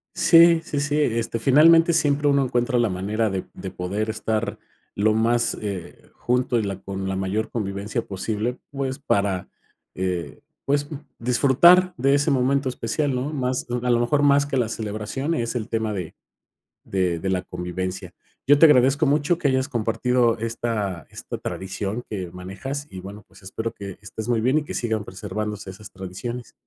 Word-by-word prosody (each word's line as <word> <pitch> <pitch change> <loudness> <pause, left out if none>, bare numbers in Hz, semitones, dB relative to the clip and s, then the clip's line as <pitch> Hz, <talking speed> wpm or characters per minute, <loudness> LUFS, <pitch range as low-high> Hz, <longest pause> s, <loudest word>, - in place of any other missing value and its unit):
Sí, 170 -1 +6
sí, 145 - -3
sí. 145 +1 0
Este, 115 -4 0
finalmente, 165 +7 +6
siempre 145 -2 +2
uno 140 -1 +3
encuentra 120 0 0
la 120 -3 +2
manera 105 +4 -1
de 95 -1 -3
de 95 - -6
poder 100 +5 -3
estar 110 0 -2 0.4
lo 110 +1 +2
más, 115 +2 +2
eh, 100 -4 -6
junto 125 0 0
y - - 0
la 100 -1 -3
con 95 0 -4
la 95 - -2
mayor 95 +3 -2
convivencia 100 -2 -3
posible, 110 +5 -3
pues, 135 -1 -3
para, 100 -9 0 0.5
eh, 90 -2 -3 0.2
pues, 145 +1 0
mm, - - -3 0.2
disfrutar 140 +10 +5
de 135 +3 +3
ese 145 +1 +2
momento 135 +1 +2
especial, 130 +3 -1
¿no?, 130 +4 -2
más 130 -3 -2
de 120 - -2
a - - +2
lo 120 -1 +3
mejor 130 +5 +2
más 140 0 +5
que 140 -2 -2
la 120 -3 +1
celebración 110 +7 -3
es 115 -5 -2
el 115 -2 -3
tema 110 -1 -1
de 90 -5 -5 0.7
de 90 -3 -1
de 95 - -2
la 90 -1 0
convivencia. 90 +1 -5 0.3
Yo 145 +1 +5
te 165 - +9
agradezco 135 +1 +4
mucho 150 +4 +2
que 150 - -1
hayas 130 0 +1
compartido 120 0 +1
esta 110 -6 -3
esta - - -7
tradición 100 +4 -4
que 95 -5 -5
manejas 100 +11 -6
y 95 - -9
bueno 100 +3 -9
pues - - -19
espero 110 +4 -4
que 100 -2 -8
estés 105 +2 -7
muy 120 -2 +2
bien 130 +6 +3
y 150 - -3
que - - -7
sigan 110 -3 -1
preservándose 105 +1 -5
esas 105 +3 -12
tradiciones. 105 +6 -6
115 Hz, 180 wpm, -23 LUFS, 100-135 Hz, 0.7 s, te